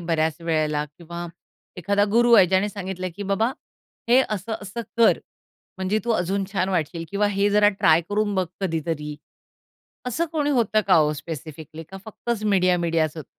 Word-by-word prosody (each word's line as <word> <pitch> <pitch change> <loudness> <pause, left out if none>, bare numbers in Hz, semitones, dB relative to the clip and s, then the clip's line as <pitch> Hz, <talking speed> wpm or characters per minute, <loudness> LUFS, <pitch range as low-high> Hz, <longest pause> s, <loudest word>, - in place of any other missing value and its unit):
बऱ्याच 160 -1 -1
वेळेला 155 -2 0
किंवा 170 +1 -7 0.5
एखादा 200 +3 +1
गुरु 240 +1 +4
आहे 190 -4 +7
ज्याने 190 +3 +2
सांगितलं, 185 -2 -5
की 205 - -5
"बाबा, 200 +4 +1 0.6
हे 250 +2 +6
असं-असं 215 +2 -4 0.2
कर, 230 - +5 0.6
म्हणजे 190 +3 0
तू 235 - -1
अजून 195 0 0
छान 195 -1 0
वाटशील 165 -2 -2
किंवा 205 +1 +1
हे 200 +1 +4
जरा 205 0 +5
ट्राय 170 -5 +3
करून 205 0 0
बघ 185 -2 +1
कधीतरी." 160 -4 -3 0.9
असं 330 +8 -1
कोणी 295 -2 0
होतं 230 -5 +2
का 180 -4 +6
ओ 150 0 +2
स्पेसिफिकली 155 +1 -8
का, 190 +5 -11
फक्तच 220 0 -4
मीडिया-मीडिया 180 -5 +2
असं 155 +1 -10
होतं? - - -11
190 Hz, 160 wpm, -23 LUFS, 165-210 Hz, 0.9 s, आहे